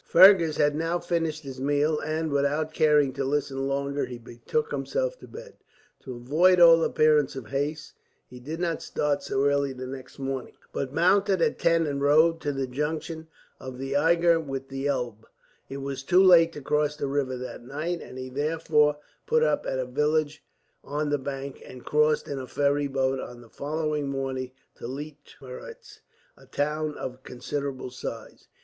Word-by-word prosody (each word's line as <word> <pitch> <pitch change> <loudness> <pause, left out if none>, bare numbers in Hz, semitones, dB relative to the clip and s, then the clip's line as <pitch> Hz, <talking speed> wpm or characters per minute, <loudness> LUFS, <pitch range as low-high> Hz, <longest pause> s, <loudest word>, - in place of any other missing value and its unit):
Fergus 175 -3 +6
had 145 0 +2
now 165 +2 0
finished 165 -3 -2
his 135 -2 -8
meal, 145 +2 +1
and 155 0 -2
without 145 +2 0
caring 150 -4 +3
to 140 +1 -3
listen 135 -1 -1
longer 140 +1 -1
he 125 - -7
betook 125 - -3
himself - - -2
to - - -12
bed. 480 +1 -11 0.4
To 130 -2 -8
avoid 160 +10 +3
all 165 -1 +8
appearance 155 -4 +3
of 125 -6 -8
haste, 150 +3 -3 0.3
he 125 - -13
did 155 +7 -6
not 170 -2 -1
start 145 -1 -1
so 135 +1 -1
early 140 -1 +1
the 130 0 -7
next 130 0 -9
morning, 135 -2 -4 0.2
but 135 -2 -3
mounted 190 +4 +3
at - - +1
ten 165 -1 +3
and 140 -2 -2
rode 160 +3 +4
to 145 - -1
the 135 -1 -2
junction 155 +4 -4 0.3
of 130 -1 -8
the 135 +1 -4
Eger 170 +2 +4
with 135 -3 -5
the 135 +1 -3
Elbe. 120 -5 -3 0.4
It 135 - -6
was 135 -1 -4
too 180 +7 +4
late 170 -3 +7
to 145 - -8
cross 150 +1 0
the 145 - -3
river 135 -2 -1
that 125 -1 -7
night, 155 +7 -4
and 125 - -10
he 130 0 -5
therefore 150 +1 +1 0.3
put 470 0 +3
up - - +1
at 130 - -1
a 130 - -1
village 150 +4 0 0.4
on 145 +1 -2
the 145 - +1
bank, 135 0 -6
and 125 - -12
crossed 150 0 +2
in 140 -2 -4
a 130 - -7
ferry 145 +1 +1
boat 135 -1 0
on 120 -1 -8
the 115 - -16
following 150 +1 -2
morning 135 -2 -3 0.3
to - - -7
Leitmeritz, 145 - -10 0.4
a - - -19
town 150 +1 -2
of 130 0 -6
considerable 130 +1 -5
size. 115 -3 -8
145 Hz, 180 wpm, -26 LUFS, 135-160 Hz, 0.4 s, all